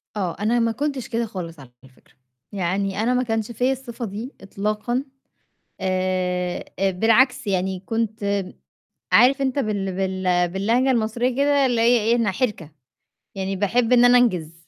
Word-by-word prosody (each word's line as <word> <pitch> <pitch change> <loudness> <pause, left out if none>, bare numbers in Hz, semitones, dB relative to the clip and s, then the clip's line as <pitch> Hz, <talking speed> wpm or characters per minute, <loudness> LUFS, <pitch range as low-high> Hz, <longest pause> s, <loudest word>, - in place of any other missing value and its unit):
آه، 185 -5 -2
أنا 230 +3 +1
ما 230 0 +1
كنتش 275 -1 -3
كده 235 0 -1
خالص 170 -7 -7
على 130 -2 -13
الفكرة، 130 -1 -22 0.4
يعني 195 +1 -1
أنا 250 +2 +2
ما 250 0 +1
كانش 225 -1 -2
فيّا 250 +3 0
الصفة 245 -3 -5
دي 220 +7 -7
إطلاقًا، 215 +6 -2 0.8
آآ، 185 -1 -1
آآ 195 0 +2
بالعكس 240 +6 +3
يعني 190 -1 -1
كنت 215 -3 -1 0.7
عارف 265 +4 +5
أنت 270 +1 0
بال 200 -5 -2
بال 185 -2 0
باللهجة 230 +8 +1
المصرية 235 +2 0
كده، 280 0 +3
اللي 240 -3 +1
هي 240 +1 +4
إيه، 230 +2 +2
أنا 230 -5 +1
حِرِكَة، 190 - -3 0.6
يعني 195 0 -3
باحب 225 +5 +1
إن 245 0 +6
أنا 245 0 +6
أنجِز، 165 -9 0
215 Hz, 155 wpm, -22 LUFS, 190-245 Hz, 0.8 s, إن